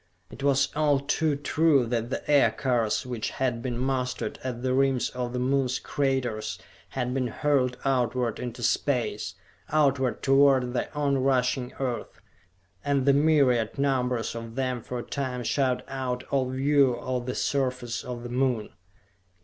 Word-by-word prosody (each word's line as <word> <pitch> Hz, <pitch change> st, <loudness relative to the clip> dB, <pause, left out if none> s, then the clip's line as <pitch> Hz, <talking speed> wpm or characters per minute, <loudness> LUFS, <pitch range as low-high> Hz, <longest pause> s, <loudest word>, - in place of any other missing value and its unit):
It -, -, -10 dB
was 140 Hz, 0 st, +3 dB
all 145 Hz, -2 st, +3 dB
too 145 Hz, +2 st, 0 dB
true 145 Hz, -1 st, +2 dB
that 115 Hz, 0 st, -2 dB
the -, -, -4 dB
Aircars 120 Hz, -3 st, +2 dB
which 120 Hz, -4 st, -3 dB
had 125 Hz, -3 st, -1 dB
been 120 Hz, -1 st, -3 dB
mustered 130 Hz, 0 st, -2 dB
at 125 Hz, -2 st, -4 dB
the 130 Hz, -1 st, +1 dB
rims 135 Hz, -1 st, +2 dB
of 125 Hz, -1 st, -3 dB
the 125 Hz, -, -3 dB
Moon's 130 Hz, 0 st, +1 dB
craters 130 Hz, -6 st, -1 dB, 0.3 s
had 125 Hz, -1 st, -2 dB
been 130 Hz, -1 st, 0 dB
hurled 125 Hz, 0 st, +1 dB
outward 125 Hz, -3 st, 0 dB
into 120 Hz, -1 st, -5 dB
space, 115 Hz, -2 st, 0 dB, 0.3 s
outward 135 Hz, -4 st, +1 dB
toward 135 Hz, -2 st, +4 dB
the 125 Hz, -, -2 dB
on 140 Hz, -2 st, +1 dB
rushing 130 Hz, -1 st, +1 dB
Earth, 125 Hz, -3 st, -3 dB, 0.6 s
and 140 Hz, -2 st, +1 dB
the 140 Hz, -, +5 dB
myriad 140 Hz, -7 st, +3 dB
numbers 125 Hz, -4 st, 0 dB
of 115 Hz, 0 st, -7 dB
them 130 Hz, -2 st, -1 dB
for 125 Hz, -, -5 dB
a 120 Hz, -, -4 dB
time 130 Hz, -3 st, -3 dB
shut 130 Hz, 0 st, 0 dB
out 130 Hz, -2 st, -3 dB
all 130 Hz, -2 st, +1 dB
view 135 Hz, -1 st, +3 dB
of 125 Hz, 0 st, -3 dB
the 125 Hz, -, -2 dB
surface 125 Hz, -4 st, -1 dB
of 120 Hz, -1 st, -6 dB
the 120 Hz, -, -6 dB
Moon. 125 Hz, -3 st, 0 dB
130 Hz, 155 wpm, -27 LUFS, 125-135 Hz, 0.6 s, the